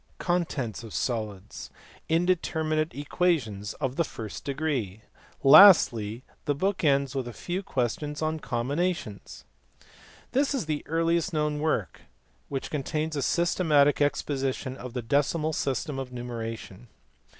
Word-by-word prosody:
Contents 165 - -1
of 110 - -9
solids. 105 -5 -4 0.4
Indeterminate 160 -2 +1
equations 140 - -1
of 135 -2 -3
the 170 - +3
first 110 -8 -7
degree. 135 -9 -2 0.4
Lastly 125 - +7 0.2
the 145 - +1
book 190 +5 -1
ends 140 -3 +2
with 135 -3 -3
a 120 - -7
few 175 - -4
questions 145 - -2
on 155 0 -1
combinations. 125 - -3 0.9
This 275 +2 +1
is 255 - -2
the 150 -1 -2
earliest 165 +2 +1
known 150 -1 0
work 150 - -1 0.5
which 135 -2 -4
contains 155 +2 -2
a - - -1
syste 175 +6 +1
matic 145 -3 +4
exposition 135 -2 -1
of 125 -2 -8
the 125 -2 -3
decimal 145 +5 +1
system 135 0 -2
of 130 -1 -6
numeration. 115 -3 -6
145 Hz, 130 wpm, -27 LUFS, 120-160 Hz, 0.9 s, Lastly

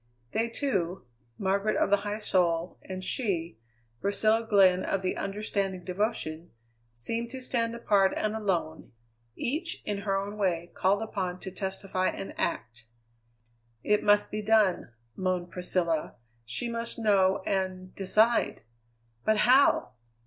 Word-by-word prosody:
They 230 +1 0
two, 195 - -2 0.3
Margaret 200 +2 +1
of - - +1
the 205 - +6
high 205 +1 -3
soul, 175 -4 0
and 185 0 -7
she, 175 - -2 0.4
Priscilla 215 +3 +2
Glenn 185 -3 +5
of 195 -1 -1
the 185 - 0
understanding 195 -2 -2
devotion, 180 -4 -2 0.4
seemed 225 - -4
to 260 - -7
stand 235 -2 -1
apart 200 -4 +3
and 215 0 -1
alone, 175 - -2 0.4
each, 320 +7 -2
in 205 -1 -2
her 200 0 -2
way, 175 -4 -1
called 200 +3 +2
upon 185 -4 -3
to 190 - -6
testify 190 0 -2
and 195 - -4
act. 115 0 -3 1.0
"It 210 0 +3
must 205 0 +3
be 215 - -2
done!" 210 - +3 0.3
moaned 180 -2 -1
Priscilla; 170 -3 -1 0.3
"she 120 - -4
must 230 0 -2
know 195 -4 +3
and 185 -1 -2
decide! 215 +4 +2 0.6
But 215 0 +3
how? 260 +4 +5
195 Hz, 130 wpm, -28 LUFS, 185-215 Hz, 1.0 s, the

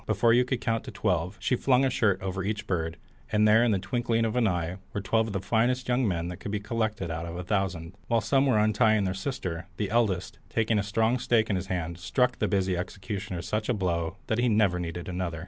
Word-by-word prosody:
Before 115 -1 +3
you 125 +1 +4
could 125 -1 -2
count 115 0 -2
twelve, 90 -1 0
she 125 - +1
flung 130 +1 +3
a 130 - +1
shirt 100 -6 +2
over 95 -1 -2
each 105 +2 -2
bird, 85 -4 -2 0.3
and 105 0 +4
there 110 +2 +6
in 120 - +3
the 100 - +2
twinkling 115 +3 0
of 110 +1 -2
an 120 -3 +3
eye 90 -1 -1 0.2
were - - 0
twelve 110 +3 +1
of 105 - -5
the 100 - 0
finest 120 +6 +1
young 125 -1 +2
men 85 -3 -1
that 90 - -6
could - - -7
be 105 0 -1
collected 110 -4 -2
out 80 +1 -4
of 85 - -6
a 90 - -4
thousand. 95 -3 -2
While 115 -1 +2
some 135 +3 +2
were 125 - +3
untying 110 0 +3
their 95 -1 0
sister, 95 -6 -4
the 105 -2 -2
eldest, 100 -6 0
taking 110 -1 +1
a - - +2
strong 110 +4 +1
stake 115 -3 +2
in - - +1
his 95 +1 -3
hand, 85 -2 -3
struck 125 +7 +1
the - - +1
busy 95 -2 +1
executioner 95 0 -5
such 105 +6 -2
a 125 - +2
blow 85 -2 -1
that 110 - -1
he 120 0 +3
never 105 -5 +3
needed 85 0 -5
another. 90 -3 -3
105 Hz, 240 wpm, -27 LUFS, 90-115 Hz, 0.3 s, there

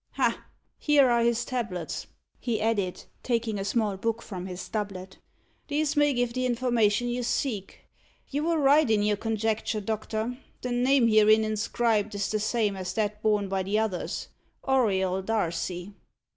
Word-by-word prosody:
Ha! - - 0 0.3
here 285 -4 +4
are 235 0 +3
his 235 0 +1
tablets," 215 -10 -4 0.3
he 235 -3 -1
added, 205 -5 -1 0.2
taking 230 -4 -1
a - - -2
small 205 -1 0
book 230 +3 -2
from 185 -3 -6
his 180 -1 -6
doublet; 195 -3 -5 0.5
"these 300 0 0
may 290 0 +4
give 245 -2 0
the 255 0 0
information 240 -2 +2
you 245 +1 -1
seek. 235 -4 -2 0.5
You 290 +2 -2
were 335 0 +2
right 290 -1 +4
in 210 -2 +3
your 210 0 +2
conjecture, 220 0 -1
doctor. 220 +3 -3 0.2
The 250 - -2
name 250 0 +3
herein 215 0 +5
inscribed 215 0 0
is 200 0 -1
the 215 - 0
same 215 -1 0
as 185 -1 -4
that 210 -1 -1
borne 210 -2 +2
by 195 0 -1
the 195 +3 0
others 215 -5 -2 0.4
Auriol 190 -8 +2
Darcy." 180 -2 -2
220 Hz, 160 wpm, -27 LUFS, 200-245 Hz, 0.5 s, herein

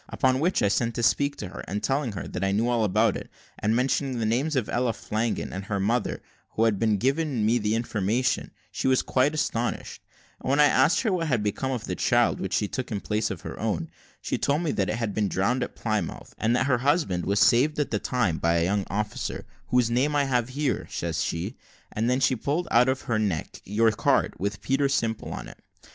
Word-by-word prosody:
Upon 130 -1 +2
which, 175 +5 +1
I - - +4
sent 115 +3 0
to 120 - -2
speak 140 +4 +2
to 100 - -6
her, - - -8
and 105 +2 -3
telling 135 -4 0
her 95 - -5
that 90 - -4
I 95 - +1
knew 110 +4 +1
all 120 -2 +2
about 105 +1 +2
it, - - -7 0.3
and 110 +2 +1
mentioning 130 +1 0
the 115 - -1
names 130 +8 0
of 125 -5 0
Ella 120 -1 0
Flanagan, 110 +2 -2
and 95 +1 -5
her 100 -1 -2
mother, 115 +4 0 0.3
who 110 - +1
had 110 -1 +2
given 135 0 0
me 115 +3 +3
the 105 0 0
information, 115 +2 0 0.2
she - - -2
was 130 -1 +3
quite 140 +4 +2
astonished; 120 -5 -2 0.4
and - - -5
when 140 +2 +2
I 150 - +8
asked 145 +3 +4
her 220 -6 +1
what 165 -3 0
had 125 -7 +1
become 105 +6 -1
of 125 -5 -2
the - - -3
child - - +2
which - - -2
she 105 - +1
took 130 +3 -5
in 105 - -1
place 105 +2 -1
of - - -5
her - - -7
own, - - -2 0.3
she - - -2
told 145 +4 +1
me 160 - 0
that 95 - 0
it - - 0
had 115 -3 -2
been 105 0 +1
drowned 115 +9 +1
at 125 - -4
Plymouth, 110 -7 -3
and 115 +2 +2
that 125 - +2
her 130 -3 +2
husband 135 - +1
was 100 +1 +2
saved 135 +7 +4
at 150 -4 -1
the 105 - +1
same - - -28
time 110 -11 0
by 85 0 +2
a 85 - +2
young 100 +2 0
officer, 105 +1 -3 0.3
`whose 125 -2 +3
name 135 +5 +1
I 145 - +3
have 125 -3 0
here,' 140 +1 -1
says 85 -1 -2
she; 90 +9 -3 0.3
and 115 +3 0
then 125 +1 +2
she 130 -1 +3
pulled 145 +9 -1
out 125 +2 +5
of 130 0 0
her 115 -2 -1
neck 95 -7 -2
your 110 +3 +3
card, 105 - +1
with 100 0 -3
Peter 135 +1 +1
Simple 115 -5 -1
on - - -6
it. - - -13
115 Hz, 235 wpm, -26 LUFS, 105-130 Hz, 0.4 s, I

